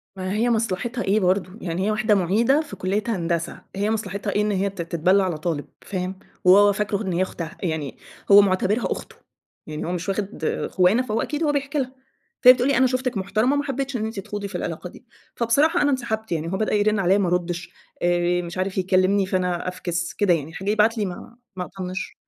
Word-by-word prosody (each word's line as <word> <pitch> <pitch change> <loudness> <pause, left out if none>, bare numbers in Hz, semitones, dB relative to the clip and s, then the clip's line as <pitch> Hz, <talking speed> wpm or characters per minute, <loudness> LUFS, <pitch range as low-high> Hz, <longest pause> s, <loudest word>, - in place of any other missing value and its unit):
ما 185 0 -4
هي 230 +3 +1
مصلحتها 230 +2 -1
إيه 205 +3 +2
برضه؟ 185 -1 +1
يعني 180 +2 -2
هي 215 - +1
واحدة 215 0 +2
مُعيدة 225 - +3
في 300 - -9
كلية 195 +3 -1
هندسة، 170 -5 -2
هي 205 +2 0
مصلحتها 200 -2 -3
إيه 205 - +3
إن 210 0 +1
هي 195 0 0
تت 190 -3 -6
تتبلى 185 +4 +3
على 175 -4 -1
طالب 155 -2 -2 0.2
فاهم؟ 185 0 -4 0.2
وهو 200 +2 +7
فاكر 210 +1 -1
إن 190 -4 -2
هي 180 - +1
أختها، 170 -2 -4
يعني 160 -5 -3 0.3
هو 205 +1 +10
معتبرها 200 +3 +1
أخته، - - -5 0.5
يعني 155 0 -5
هو 175 - -3
مش 180 +2 -3
واخد 200 +1 -3 0.3
خوانة 190 +6 +4
فهو 215 +1 0
أكيد 305 +1 -2
هو 295 - +2
بيحكي 280 0 -2
لها، 260 -1 -2 0.5
فهي 250 -1 +10
بتقول 250 +1 0
لي: 280 - +3
"أنا 260 -1 +5
شوفتِك 255 -3 -1
محترمة 215 +8 +1
ما 285 - 0
حبيتش 270 -2 -3
إن 215 - -2
أنتِ 220 -2 -5
تخوضي 200 +1 -5
في 200 - -9
العلاقة - - -4
دي"، - - -16 0.3
فبصراحة 285 +9 +2
أنا 290 -1 +3
انسحبت 220 -5 -2
يعني 165 +1 -2
هو - - 0
بدأ 215 - 0
يرن 210 0 +2
عليه 190 +1 +3
ما 195 -3 +1
أردش، 175 -1 -1 0.3
آآ 175 0 +2
مش 170 +1 -7
عارف 190 +1 -2
يكلمني 190 +1 +2
فأنا 180 -2 -1
أفكِس، 175 -1 -3
كده 200 -4 +3
يعني 160 -2 -2
يخلّيه 195 +4 -2
يبعت 220 +2 +3
لي 210 - 0
ما 195 +6 -8 0.2
ما 180 -1 -3
أطنش. 185 0 -6
195 Hz, 215 wpm, -23 LUFS, 180-220 Hz, 0.5 s, هو